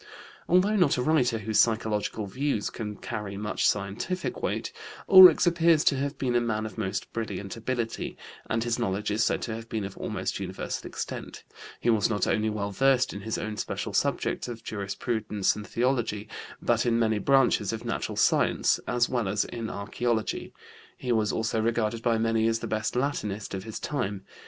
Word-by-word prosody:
Although 190 +5 +4
not 175 -9 +3
a 125 - 0
writer 125 -6 +2
whose 110 0 0
psychological 110 -1 +1
views 130 +1 -1
can 105 -2 -5
carry 100 -1 -5
much 105 +1 +1
scientific 105 - -3
weight, - - -2 0.4
Ulrichs 185 -4 +9
appears 170 -2 +4
to 140 - +4
have 140 +2 -2
been 125 -2 -1
a 120 - +3
man 110 -2 -1
of 110 - -7
most 100 -4 -3
brilliant 100 -4 -4
ability, 115 0 -3 0.3
and 115 0 0
his 120 0 -1
knowledge 105 -2 -1
is 110 +1 +2
said - - 0
to 115 - -3
have 115 +1 -7
been 110 -2 -2
of 95 - -7
almost - - -3
universal - - -4
extent; - - -6 0.4
he 120 - +2
was 110 -1 +2
not 105 -2 +1
only 110 0 +1
well 100 -1 -3
versed 130 +3 +3
in 100 - -6
his 110 +2 -3
own 110 0 -4
special - - -3
subjects - - 0
of 115 -2 -7
jurisprudence 105 0 -1
and 105 0 -7
theology, 115 -4 0 0.4
but - - +2
in 115 -1 +2
many 110 -2 +2
branches 135 +4 +3
of - - -5
natural - - -3
science, - - +3
as 120 0 +2
well 120 -5 -1
as 105 +2 0
in 115 -2 -5
archeology; 110 +1 -2 0.5
he 125 - -3
was 110 -3 +2
also 110 0 0
regarded 115 0 0
by 115 -1 +2
many 115 0 +2
as 115 0 +2
the - - -6
best 110 +1 -2
Latinist 110 -7 -2
of 95 +1 -5
his 110 - -6
time. 105 -9 -3
115 Hz, 185 wpm, -27 LUFS, 105-125 Hz, 0.5 s, Ulrichs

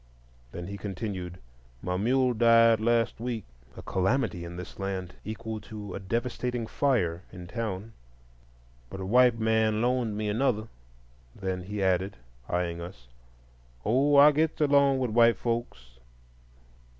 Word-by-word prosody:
Then 85 - -6
he 100 +2 -6
continued, 95 -3 -5 0.5
"My 90 - -1
mule 125 +6 +2
died 115 -1 +5
last 115 0 +1
week,"—a 95 - -7
calamity 95 -1 0
in 85 0 -7
this 90 +2 -9
land 95 -2 -4
equal 110 0 -5
to 105 -2 -8
a - - -4
devastating 120 +3 -2
fire 95 -11 0
in 90 -1 -9
town,—"but - - -9
a 95 - -4
white 125 +3 +5
man 110 -1 +2
loaned 120 -3 0
me 105 0 -2
another." 110 0 0 0.7
Then 95 -2 -3
he 100 +2 -4
added, 95 -1 +1 0.3
eyeing 85 -1 -1
us, 65 -8 -10 0.8
"Oh, 135 +6 +3
I 145 +2 +9
gets 155 +2 0
along 140 -2 +4
with 125 -3 -1
white 115 +1 +5
folks." 65 - -4
105 Hz, 130 wpm, -28 LUFS, 90-120 Hz, 0.8 s, I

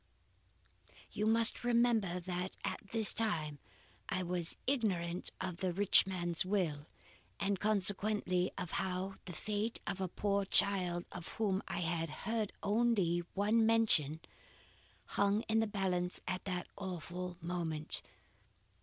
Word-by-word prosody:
"You 210 - -1
must 225 +1 +3
remember 235 -6 +2
that 180 +1 -3
at - - -2
this 225 -3 +4
time 155 -10 -1 0.5
I 185 - -1
was 175 -1 -1
ignorant 185 -10 0
of 180 -2 -4
the 185 -1 -1
rich 195 +1 +6
man's 175 -3 +3
will, 175 -7 -1 0.5
and 195 -1 0
consequently 205 -2 +2
of 180 - -4
how 190 +1 -2
the 180 - -7
fate 210 +6 -2
of 190 - -3
a 190 - 0
poor 200 +2 0
child 180 -3 +2
of 175 - -7
whom 200 -3 0
I - - -3
had 165 -1 -1 0.2
heard 220 -1 -1
only 205 -5 +2 0.2
one 210 +3 +3
mention, 215 -10 +3 0.8
hung 200 +2 +1
in 220 0 +1
the 225 - +1
balance 185 -3 0
at 185 0 -3
that 180 -2 -3
awful 180 -1 -5
moment. 165 -3 -3
190 Hz, 130 wpm, -35 LUFS, 175-210 Hz, 0.8 s, rich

